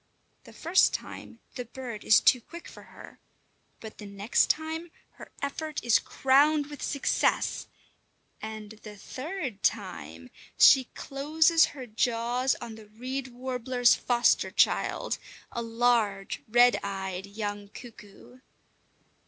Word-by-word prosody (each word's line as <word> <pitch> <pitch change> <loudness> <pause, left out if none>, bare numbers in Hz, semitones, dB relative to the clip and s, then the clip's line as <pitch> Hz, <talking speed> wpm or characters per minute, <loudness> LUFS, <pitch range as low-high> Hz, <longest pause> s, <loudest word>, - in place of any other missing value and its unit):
The - - -13
first 345 +4 +3
time 230 - -9
the 250 -2 -6
bird 240 -3 -8
is 215 - +6
too 250 - +4
quick 340 +8 -11
for - - -12
her, - - -14 0.6
but 220 -1 -11
the 210 - -8
next 200 +3 +1
time 320 +2 -2 0.3
her - - -12
effort 305 +2 -3
is 235 -2 +4
crowned 290 +2 +2
with 290 - -9
success; 280 - 0 0.7
and 215 -1 -7
the 210 -1 -11
third 265 - -6
time 185 - -3 0.3
she 265 -2 +7
closes 315 +4 +2
her 260 - -6
jaws 240 +2 0
on 230 - -8
the 220 -1 -13
reed 255 +5 -5
warbler's 250 -1 +1
foster 240 -1 +2
child, - - +1 0.3
a 235 - -4
large, 230 -4 0
red 240 +2 +5
eyed 190 -1 -5
young 205 0 -5
cuckoo! 225 +1 -14
240 Hz, 125 wpm, -28 LUFS, 215-275 Hz, 0.7 s, she